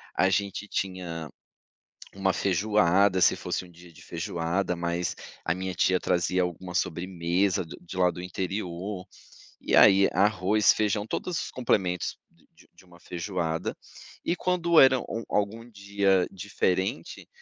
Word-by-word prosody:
a 95 - +3
gente 100 +1 -1
tinha 90 -5 -4 0.9
uma 95 -1 +1
feijoada, 100 0 +2
se - - +5
fosse - - -3
um 90 - -15
dia 85 0 -16
de - - -16
feijoada, 85 +2 -2
mas 85 +1 -2 0.3
a 85 - +1
minha 95 0 -4
tia 90 +1 +2
trazia 90 +1 +1
alguma 90 0 -5
sobremesa 90 +1 0
o - - -11 0.2
de 90 - -9
lá 90 -1 +3
do 90 - -8
interior, 90 +1 -4 0.6
e - - +1
aí 100 0 +7
arroz, 105 +1 +3
feijão, 105 -1 0
todos 175 +7 -3
os - - -8
complementos 95 -8 0
de - - -29 0.3
de 95 - -20
uma 85 -1 -18
feijoada. 85 -2 -3 0.5
E 170 - 0
quando 170 -2 +3
era 130 -1 +7
a - - -4 0.3
algum 110 +3 -2
dia 100 -3 +1
diferente, 95 -2 -2
95 Hz, 140 wpm, -27 LUFS, 90-100 Hz, 0.9 s, aí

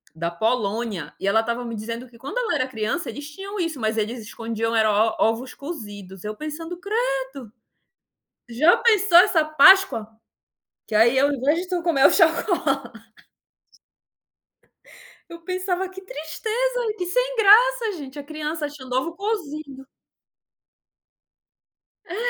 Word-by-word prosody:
da 170 +1 -3
Polônia, 215 -1 -2
e - - -3
ela 220 +3 +3
estava 235 +2 -3
me 230 -1 -5
dizendo 230 +3 -6
que 235 - -18
quando 280 - -5
ela 465 -2 -1
era 255 - 0
criança 245 +8 -3
eles 290 +1 -8
tinham 395 +5 -7
isso, 330 -5 -2
mas 220 -1 -1
eles 220 +3 -2
escondiam 225 +1 -3
e - - +4
era 215 -1 +3
o 215 +2 +2
ovos 230 +4 -1
cozidos. 205 - -9
Eu 210 0 -5
pensando: 325 +5 -6
"Credo", 270 - -3 1.0
já 280 +9 +4
pensou 420 -6 +4
essa 350 -3 +5
páscoa? 310 - +5 0.8
Que - - -9
aí 235 +4 +5
ao 280 +2 +3
invés 285 +4 +1
de 365 - -9
tu 360 -2 -1
comer 315 -6 +3
o - - +8
chocolate. 320 - +1 2.3
Eu 335 0 -10
pensava 370 +1 -2
que 380 +1 -11
tristeza, 445 +8 -3
que 360 - -3
sem - - 0
graça 455 +2 +5
gente, 275 -1 -9
a 290 - -6
criança 305 +1 -4
achando 275 -4 -8
ovo 325 +6 -1
cozido. 310 -10 -5 2.2
É. 350 - -6
290 Hz, 145 wpm, -23 LUFS, 230-365 Hz, 2.3 s, o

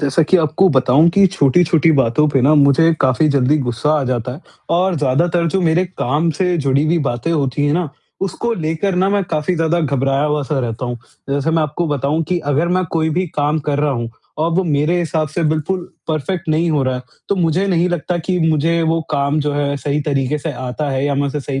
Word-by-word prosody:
जैसा 145 +2 +2
कि 160 +5 +3
आपको 160 +3 +2
बताऊँ 135 +2 +4
कि 200 -1 +6
छोटी-छोटी 165 -1 +2
बातों 135 +2 +2
पे 135 -2 +2
ना 145 +5 +4
मुझे 145 +3 +4
काफ़ी 130 +4 +2
जल्दी 140 0 +2
गुस्सा 125 +2 -1
आ - - -2
जाता 125 0 -2
है 140 - -10 0.4
और 185 +1 +1
ज़्यादातर 160 +5 +1
जो 190 - +2
मेरे 170 +1 +2
काम 160 -1 -1
से 180 -2 +1
जुड़ी 140 0 +1
हुई 170 +2 +2
बातें 120 +7 -3
होती 145 -2 0
है 145 - +1
ना, 170 0 0 0.3
उसको 195 +5 -2
लेकर 165 +2 -2
ना 190 +2 +2
मैं 200 -1 +1
काफ़ी 155 +4 0
ज़्यादा 165 +1 0
घबराया 135 -1 0
हुआ 150 0 0
सा 140 +1 -2
रहता 120 -1 -3
हूँ। 120 0 -4 0.3
जैसे 140 +3 0
मैं 160 0 +2
आपको 155 +3 -2
बताऊँ 145 +2 0
कि 180 - +1 0.2
अगर 165 +5 +1
मैं 185 - 0
कोई 160 -1 +1
भी 185 - 0
काम 150 +2 +1
कर 145 -1 0
रहा 150 0 +1
हूँ 120 -2 -4 0.3
और 160 +2 +1
वो 185 +3 +2
मेरे 155 +2 +1
हिसाब 160 -2 -1
से 160 +4 -3
बिल्कुल 170 +4 -2 0.2
परफेक्ट 165 +3 -3
नहीं 160 +2 +1
हो 150 -3 +1
रहा 130 -1 0
है, 125 - -5 0.3
तो - - +2
मुझे 175 +2 +1
नहीं 180 -2 +1
लगता 175 0 -2
कि 180 +2 -2
मुझे 160 0 +1
वो 165 0 +1
काम 140 0 0
जो 145 0 -1
है 145 0 -1
सही 140 +2 -2
तरीके 140 0 -1
से 155 +2 -4
आता 130 +3 -4
है 135 0 -1
या 145 0 0
मैं 140 +1 0
उसे 145 +1 -3
सही 135 0 -4
150 Hz, 230 wpm, -17 LUFS, 140-170 Hz, 0.4 s, कि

